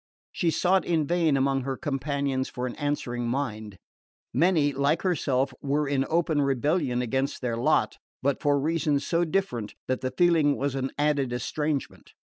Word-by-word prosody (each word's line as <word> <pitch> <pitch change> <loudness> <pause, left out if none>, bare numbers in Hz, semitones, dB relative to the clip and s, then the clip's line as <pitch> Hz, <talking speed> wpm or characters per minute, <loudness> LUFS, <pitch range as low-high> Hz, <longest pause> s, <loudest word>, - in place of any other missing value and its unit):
She 170 - 0
sought 185 +3 +2
in 160 -3 +1
vain 165 -3 +2
among 135 0 +1
her 135 0 -3
companions 140 -1 -2
for 125 - -4
an 125 - -3
answering 125 -5 -2
mind. 110 -6 -3 0.6
Many, 160 -5 +3
like 140 +4 +1
herself, 135 -7 0
were 145 +1 0
in 135 -1 0
open 160 -2 +1
rebellion 140 -1 +1
against 130 +3 -2
their 120 -2 -1
lot; 120 +2 +1 0.2
but 140 +1 0
for 145 -1 +2
reasons 150 -1 0
so 170 0 +1
different 155 - -2
that 130 - -1
the 130 - -1
feeling 165 -3 +3
was 140 0 -1
an 135 0 -2
added 145 -3 +1
estrangement. 145 +4 -3
140 Hz, 160 wpm, -26 LUFS, 130-155 Hz, 0.6 s, Many